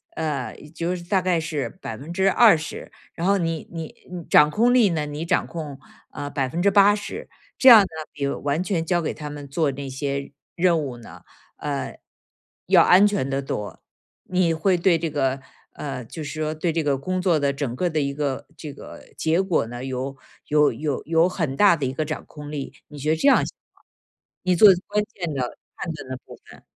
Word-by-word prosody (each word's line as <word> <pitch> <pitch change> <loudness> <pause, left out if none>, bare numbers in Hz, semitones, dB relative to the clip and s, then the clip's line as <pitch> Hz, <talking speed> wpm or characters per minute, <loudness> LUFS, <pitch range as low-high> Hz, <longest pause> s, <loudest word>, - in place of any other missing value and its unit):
呃， 155 -3 -3 0.2
就 175 +2 -1
是 175 - -8
大 190 +2 +1
概 180 -2 +1
是 155 -3 -3
20%， 175 - +1 0.2
然 170 - -4
后 200 0 +4
你 165 -3 -2
你 165 -2 -6 0.2
你 180 -2 -6
掌 150 - +6
控 235 +9 +3
力 235 -6 +5
呢， 155 -3 -1
你 150 +2 -5
掌 - - +1
控， 150 -5 -7 0.3
啊， 145 - -6
80%， 195 +9 +2 0.3
这 265 - +7
样 230 -3 +11
呢， 195 - 0 0.2
比 140 -2 -3
完 145 +3 -1
全 185 -4 -1
交 175 +1 +1
给 160 - -2
他 150 -1 -7
们 145 -1 -8
做 145 +1 0
那 135 +1 -6
些 140 +1 -3 0.2
任 175 -1 +3
务 130 -4 -6
呢， 120 - -13 0.4
呃， 145 -2 -4 0.7
要 - - +6
安 190 +3 +6
全 200 -10 -1
得 135 0 -1
多， 105 -6 -5 0.4
你 180 -2 +1
会 180 +4 +2
对 175 0 +3
这 165 0 -2
个 135 -2 0 0.3
呃， 135 -3 -5
就 155 +8 -9
是 150 +2 -6
说 155 0 -1
对 160 +1 -1
这 165 - 0
个 140 -2 +1
工 185 +7 -2
作 175 -4 +2
的 140 -1 +1
整 135 -4 -3
个 180 - 0
的 155 -2 0
一 140 0 -1
个 140 -2 -3
这 150 -3 -7
个 - - -11
结 160 +3 +1
果 190 -10 +1
呢， 120 +2 -7
有 135 +1 -4 0.3
有 150 -3 +3
有 145 +2 -3
有 165 +2 +3
很 160 -7 -2
大 200 0 +5
的 145 - -2
一 130 - -2
个 155 - -1
掌 155 0 -5
控 150 -1 -10
力。 145 -3 -5
你 150 - -12
觉 145 +2 -2
得 - - +3
这 160 - +1
样 - - +6
行 - - -8 0.2
吗？ - - -29 0.6
你 185 -1 +2
做 205 +4 +8 0.2
关 210 0 0
键 175 -4 -4
的、 125 -3 -3 0.2
判 170 - -4
断 140 -4 -10
的 130 - -4
部 - - -12
分。 - - -16
155 Hz, 215 characters per minute, -23 LUFS, 140-180 Hz, 0.7 s, 样